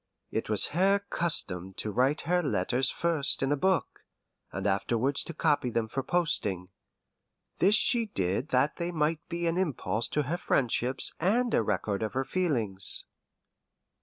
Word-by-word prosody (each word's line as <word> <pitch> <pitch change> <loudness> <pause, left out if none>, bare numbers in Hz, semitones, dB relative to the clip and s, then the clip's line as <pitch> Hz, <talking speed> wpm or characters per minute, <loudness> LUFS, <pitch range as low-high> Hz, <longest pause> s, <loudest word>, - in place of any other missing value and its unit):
It - - -3
was 105 -2 +4
her 195 +4 +3
custom 95 - -1
to 105 - -4
write 130 +7 +1
her 180 +1 +1
letters 125 - 0
first 160 -5 0
in 135 - 0
a - - +3
book, 185 +4 0 0.5
and 95 +1 -5
afterwards 115 +7 0
to 170 - -7
copy 145 -5 +1
them 115 -1 -1
for 135 +4 -3
posting. 105 - -1 0.9
This 200 +4 +5
she 230 0 +3
did 95 - -1
that 130 +3 +1
they 175 0 -3
might 155 -1 0
be 170 0 -3
an 165 +1 0
impulse 115 - -1
to 150 - -1
her 155 +6 -2
friendships 130 -4 0
and 230 +8 +1
a - - +3
record 105 -1 -2
of 110 - -3
her 135 0 0
feelings. 115 - +1
140 Hz, 160 wpm, -28 LUFS, 110-170 Hz, 0.9 s, This